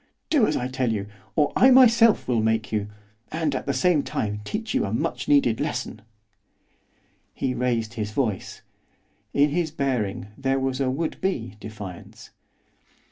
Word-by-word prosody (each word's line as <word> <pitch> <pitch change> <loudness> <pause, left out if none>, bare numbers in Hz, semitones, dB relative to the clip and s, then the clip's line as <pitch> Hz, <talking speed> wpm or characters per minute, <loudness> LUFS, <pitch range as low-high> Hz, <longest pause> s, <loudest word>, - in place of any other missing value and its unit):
Do 275 -9 +4
as - - 0
I 125 - -2
tell 130 -2 -1
you, 100 -3 -2 0.3
or 145 - +2
I 260 - +6
myself 235 -4 +6
will 120 -3 +2
make 110 0 0
you, 105 -2 -1 0.4
and, 155 -2 -1
at 130 - -4
the - - +2
same 145 +4 +2
time, 105 -6 -3
teach 220 - -4
you - - +2
a 100 - -2
much 125 +3 -2
needed 140 -6 +3
lesson.' 125 -7 -3 1.3
He 125 - -1
raised 115 -3 -1
his 105 -3 -3
voice. 110 -4 -3 0.7
In 145 +1 +3
his 165 +1 0
bearing 125 -10 -2
there 135 0 0
was 130 0 -1
a 130 - +1
would 155 +5 -3
be 120 - -2
defiance. 100 -5 -10
130 Hz, 160 wpm, -24 LUFS, 110-150 Hz, 1.3 s, I